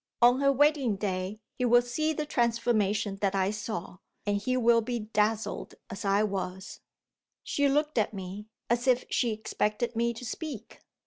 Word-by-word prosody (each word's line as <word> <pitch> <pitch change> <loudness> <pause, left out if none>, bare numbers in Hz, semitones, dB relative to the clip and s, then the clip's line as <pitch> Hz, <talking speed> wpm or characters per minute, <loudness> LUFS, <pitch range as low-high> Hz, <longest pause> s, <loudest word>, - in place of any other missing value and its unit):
On 245 +3 +5
her 275 0 +5
wedding 280 -5 +3
day, 195 +1 -3 0.2
he 250 - +2
will 245 0 +5
see 310 +6 -1
the 305 -1 -2
transformation 225 -6 +1
that 195 -1 0
I 190 0 +2
saw 210 -4 -5 0.3
and 205 0 +1
he 255 +5 -1
will 235 -1 +4
be 240 +2 -2
dazzled 215 +1 -1 0.2
as 195 +3 -6
I 200 +1 +3
was. 190 -2 -4 0.6
She 285 -1 +1
looked 295 -2 +1
at 215 - +1
me, 195 +1 -7 0.2
as 240 +2 0
if 250 -1 +3
she 240 - +2
expected 215 +2 -2
me 235 +1 +1
to 250 - -8
speak. 245 -2 -6
225 Hz, 170 wpm, -29 LUFS, 205-245 Hz, 0.6 s, On